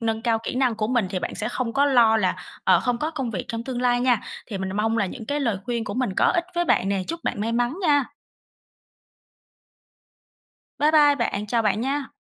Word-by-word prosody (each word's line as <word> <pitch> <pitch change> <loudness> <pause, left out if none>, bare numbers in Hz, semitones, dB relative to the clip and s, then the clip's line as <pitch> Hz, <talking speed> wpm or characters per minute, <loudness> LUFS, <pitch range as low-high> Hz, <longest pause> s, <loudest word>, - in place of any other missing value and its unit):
Nâng 225 -1 -1
cao 230 -2 +1
kỹ - - -4
năng 255 -3 +1
của 215 -1 -1
mình 240 -4 +1
thì 185 - -1
bạn - - -4
sẽ 215 - -3
không 245 -2 -3
có 280 +1 +3
lo 235 -5 +5
là, 190 -4 +1 0.3
ờ, - - +5
không 245 -1 -1
có 310 +4 -2
công 270 -7 -3
việc 190 -5 -4
trong 230 0 -4
tương 250 -1 -4
lai 245 -1 +2
nha. 245 -3 +2 0.3
Thì 200 -5 -5
mình 190 0 -3
mong 225 +2 +1
là 200 - +1
những 220 +4 -8
cái 290 +3 -1
lời 230 -7 0
khuyên 235 -1 -2
của - - -5
mình 255 -5 0
có - - +3
ích 345 - +1
với 345 0 +1
bạn 195 - +2
nè. 195 -1 0
Chúc 335 0 -5
bạn - - -2
may 225 +2 -1
mắn 245 +5 0
nha! 290 -5 +3 2.7
Bye 300 +1 +4
bye 295 -2 +6
bạn! 210 -6 -2
Chào 230 +1 +1
bạn 210 0 +1
nha! 275 +2 -2
240 Hz, 235 wpm, -24 LUFS, 220-270 Hz, 2.7 s, bye